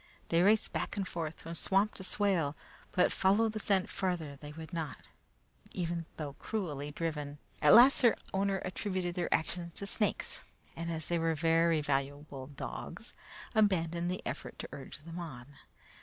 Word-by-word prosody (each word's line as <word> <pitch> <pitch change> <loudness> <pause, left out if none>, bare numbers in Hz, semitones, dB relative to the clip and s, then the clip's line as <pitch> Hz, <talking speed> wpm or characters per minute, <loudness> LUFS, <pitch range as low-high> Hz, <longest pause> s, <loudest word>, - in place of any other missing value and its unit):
They 165 0 +4
raced 210 +3 +4
back - - -2
and 195 -2 -1
forth 165 -3 -4
from 165 - -6
swamp 195 +5 +4
to 190 - -8
swale, 185 -7 +1 0.4
but 180 - +3
follow 205 +4 +3
the 215 0 -4
scent 195 -2 +2
farther 175 -7 -2
they 145 +1 -9
would 160 +3 -9
not, 160 -3 -3 0.8
even 170 -2 -2
though 145 -3 -4
cruelly 150 -10 -3
driven. 150 -2 -3 0.2
At 150 -1 +8
last 255 +4 +8
their 235 -4 +6 0.2
owner 195 0 +1
attributed 185 -1 -2
their 175 -1 -2
actions 170 +1 -1
to 200 - -4
snakes, 210 +1 0 0.4
and 170 0 -3
as 160 -1 -3
they 170 -1 0
were 165 0 +1
very 165 0 +3
valuable 140 -1 -2
dogs, 140 -1 -7 0.4
abandoned 175 -6 +2
the 180 - -4
effort - - -5
to - - -6
urge 140 +1 -9
them 165 +1 -6
on. 135 -8 -7
170 Hz, 165 wpm, -32 LUFS, 155-190 Hz, 0.8 s, At